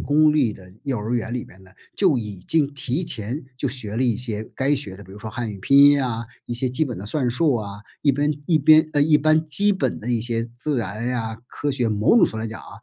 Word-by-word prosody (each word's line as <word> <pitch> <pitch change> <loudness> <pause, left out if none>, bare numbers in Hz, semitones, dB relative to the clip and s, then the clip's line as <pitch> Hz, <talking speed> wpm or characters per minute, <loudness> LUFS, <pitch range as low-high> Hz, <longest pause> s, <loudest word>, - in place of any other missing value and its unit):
公 150 +1 +3
立 130 -8 +2
的 90 -2 -15
幼 130 -5 -1
儿 110 +4 -3
园 120 0 -2
里 125 - -3
面 95 +1 -17
呢， 95 - -18 0.3
就 175 -11 +3
已 105 -3 -6
经 145 - 0
提 135 +5 -2
前 120 +3 -2
就 140 - -2
学 115 -4 -5
了 130 - +1
一 120 -4 +1
些 110 -3 -2
该 140 +2 +2
学 100 -9 -4
的 100 - -12
比 95 - -16
如 105 - -11
说 110 +1 -7
汉 115 0 -4
语 100 - -8
拼 140 +8 +3
音 145 0 +7
啊， 115 -1 -3 0.2
一 120 - -5
些 125 +2 0
基 150 +6 +1
本 120 -8 -5
的 100 - -7
算 125 0 0
术 145 +2 +2
啊， 105 -2 -5 0.2
一 145 - +4
边 145 +2 +1
一 160 -3 +3
边， 155 +2 +5
呃， 145 - +3
一 150 0 +5
般 155 +1 +2
基 205 +7 +4
本 190 - -1
的 120 +3 -4
一 115 -2 +1
些 115 -1 -1
自 145 +2 -1
然 110 +1 -3
呀、 115 -3 -3
科 145 - -3
学 125 -4 0
某 105 0 +1
种 - - +7
程 - - -6
度 110 - -5
上 - - -4
来 - - -3
讲 110 - -8
啊， - - -13
125 Hz, 295 characters per minute, -22 LUFS, 110-145 Hz, 0.3 s, 音